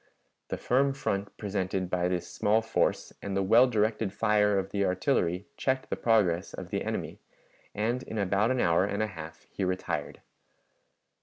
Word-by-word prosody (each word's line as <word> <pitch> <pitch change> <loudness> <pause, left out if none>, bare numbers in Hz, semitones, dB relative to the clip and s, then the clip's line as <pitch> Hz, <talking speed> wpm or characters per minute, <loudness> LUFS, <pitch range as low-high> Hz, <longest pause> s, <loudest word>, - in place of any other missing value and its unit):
The - - -3
firm 135 +2 +2
front 100 -8 -3
presented 95 -2 -2
by 90 -1 +1
this 90 -1 -2
small 110 +2 +1
force 110 - 0
and 100 -1 -3
the 100 - +2
well 115 +6 +6
directed 110 -3 0
fire 105 -1 +2
of 95 0 -2
the 100 -1 0
artillery 90 -2 +1
checked 130 0 -1
the - - +1
progress 100 -7 +2
of - - -8
the - - -1
enemy, - - -4 0.6
and 115 +4 0
in 110 - -7
about 100 +2 +2
an 130 -1 +1
hour 85 -2 +3
and 100 +2 -1
a - - 0
half 80 0 -9
he 100 - -3
retired. 95 0 -2
100 Hz, 170 wpm, -29 LUFS, 95-115 Hz, 0.6 s, well